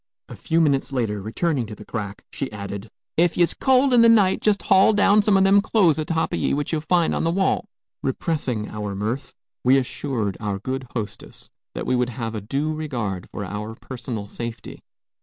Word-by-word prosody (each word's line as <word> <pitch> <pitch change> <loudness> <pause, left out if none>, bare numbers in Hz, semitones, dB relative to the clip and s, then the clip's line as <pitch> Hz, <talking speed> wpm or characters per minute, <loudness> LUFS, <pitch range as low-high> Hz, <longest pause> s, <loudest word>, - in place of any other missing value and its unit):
A - - -9
few 165 +1 +1
minutes 140 -3 +1
later, 110 -6 -1
returning 125 - -1
to 105 - -8
the 105 - -12
crack, 100 -2 -5
she 150 -4 -4
added, 100 0 -6 0.3
"Ef 175 0 +3
ye's 175 -1 +3
cold 265 0 +3
in 240 - +7
the 230 - +7
night, 205 -5 +4
jest 210 -2 +2
haul 195 +3 +5
down 205 0 +5
some 205 -1 +3
o' - - +4
them 195 +1 +5
clothes 190 -7 +3
atop 160 +1 -1
o' - - +2
ye - - 0
which 145 0 -2
ye'll 160 -2 0
find 170 +2 +2
on - - -1
the 165 - +1
wall." 190 +3 0 0.3
Repressing 130 -6 -2
our 105 -2 -4
mirth, 110 +7 -3 0.3
we 130 +2 +5
assured 125 -6 -2
our 105 -2 -2
good 130 +5 -4
hostess 110 -4 -6 0.2
that - - -4
we 130 - +1
would 125 0 +1
have 115 -2 -4
a 110 - -4
due 140 +9 -2
regard 120 - -4
for 105 - -5
our 105 +3 -5
personal 120 -4 -6
safety. 115 +2 -7
135 Hz, 200 wpm, -23 LUFS, 110-170 Hz, 0.3 s, in